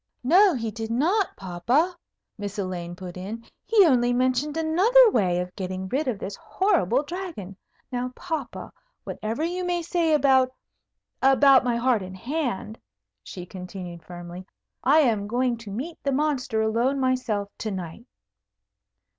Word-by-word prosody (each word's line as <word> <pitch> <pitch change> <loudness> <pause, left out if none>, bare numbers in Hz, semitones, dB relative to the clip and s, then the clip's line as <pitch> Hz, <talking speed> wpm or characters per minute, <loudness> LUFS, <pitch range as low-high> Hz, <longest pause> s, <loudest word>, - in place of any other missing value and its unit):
"No, 365 +7 +5
he 225 -3 -3
did 225 0 -5
not, 345 - +1
papa," 235 - 0 0.4
Miss 205 0 -6
Elaine 180 -3 -4
put 180 0 -9
in. 215 +5 -7 0.2
"He 425 -4 +5
only 245 -5 +3
mentioned 255 +4 0
another 410 +10 +5
way 180 - +1
of 180 0 -5
getting 185 0 -4
rid 275 +5 -1
of 240 -5 -1
this 195 0 -6
horrible 315 - +1
Dragon. 325 - -6 0.4
Now, 250 0 -2
papa, 320 -7 -5 0.3
whatever 225 +8 -4
you 355 +2 -2
may 350 -1 -1
say 335 -1 0
about 260 -2 +3 0.7
about 270 0 +6
my 245 -2 0
heart 235 -2 +2
and 185 0 -8
hand," 240 - -3 0.4
she 180 - -9
continued 180 -1 -8
firmly, 175 +1 -9 0.4
"I 300 +4 +5
am 220 -7 +1
going 245 +2 0
to 230 -2 -10
meet 280 +11 -6
the 280 - -1
Monster 265 -6 0
alone 235 +5 +1
myself, 255 -6 0
to 220 - -3
night." 190 +4 -7
245 Hz, 145 wpm, -25 LUFS, 195-300 Hz, 0.7 s, about